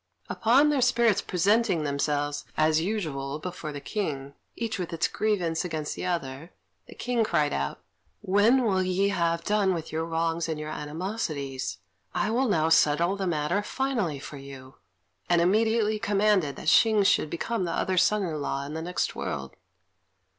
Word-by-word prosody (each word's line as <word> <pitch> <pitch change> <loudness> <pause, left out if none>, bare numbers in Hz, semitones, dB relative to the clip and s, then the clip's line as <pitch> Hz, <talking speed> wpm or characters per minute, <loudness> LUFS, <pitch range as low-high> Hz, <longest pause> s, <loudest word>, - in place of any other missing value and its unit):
Upon 265 +7 +4
their 285 -3 +1
spirits 235 -4 +3
presenting 195 -1 +2
themselves, 145 0 -1
as 155 0 +3
usual, 155 -8 -3
before 170 -1 -6
the 145 - -6
King, 140 -7 -4 0.2
each 225 -4 -3
with 180 - -4
its 165 - 0
grievance 180 -7 0
against 155 -4 -3
the - - -4
other, 160 -2 -4 0.4
the - - -12
King 245 -2 0
cried 150 -8 +1
out, 70 0 -3 0.4
"When 215 +7 +3
will 195 -5 +2
ye 185 +2 +1
have 170 -3 0
done 200 -2 +2
with 160 -2 -6
your 160 +1 -1
wrongs 165 0 -1
and 155 -1 -3
your 155 0 -5
animosities? 150 - -4 0.4
I 215 - 0
will 255 +3 +1
now 160 -5 +2
settle 165 +3 +3
the 195 -1 -2
matter 155 +4 0
finally 235 - -2
for 140 +1 -9
you;" 135 -1 -11 0.5
and 175 -1 +4
immediately 215 +4 +2
commanded 200 -8 +2
that - - -9
Hsing 215 +4 +5
should 175 -5 +3
become 190 +5 -2
the 170 - -2
other's 185 +2 +1
son 210 +2 +2
in 155 -5 -3
law 140 0 -2
in 145 - -7
the 160 - -4
next 180 +2 -2
world. 70 -2 -5
170 Hz, 170 wpm, -27 LUFS, 150-210 Hz, 0.5 s, Hsing